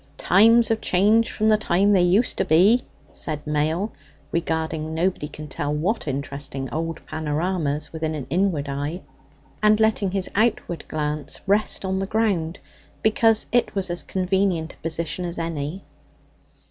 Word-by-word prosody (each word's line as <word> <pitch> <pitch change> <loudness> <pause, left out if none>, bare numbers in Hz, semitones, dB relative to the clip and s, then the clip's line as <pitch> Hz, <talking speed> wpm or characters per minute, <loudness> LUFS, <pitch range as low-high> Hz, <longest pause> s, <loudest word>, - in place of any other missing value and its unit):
"Times 225 +4 +5
have 225 -1 0
changed 210 +5 +3
from 215 - -1
the 215 -1 +5
times 200 +1 +2
they 190 - +4
used 190 +7 +3
to - - +3
be," 195 +10 +5 0.3
said 150 -2 -2
Mail, 155 +7 0 0.4
regarding 160 -1 -2
nobody 170 -2 0
can 150 0 -9
tell 145 +1 -3
what 165 +7 -1
interesting 140 0 -4
old 165 +1 -4
panoramas 155 -1 -2
with 160 - -7
an 160 -1 -1 0.2
inward 170 -5 +1
eye, 145 +6 -3 0.6
and 215 0 +4
letting 220 -3 +2
his 190 0 -1
outward 205 -7 0
glance 150 -1 -3
rest 200 0 +1
on 190 0 -1
the 195 - -2
ground, 195 -7 0 0.5
because 220 0 +4
it 240 -3 +1
was 190 -2 0
as 175 - +1
convenient 185 -3 0
a - - -23
position 165 +2 -3
as 175 -1 -4
any. 165 +1 -4
175 Hz, 150 wpm, -23 LUFS, 155-200 Hz, 0.6 s, Times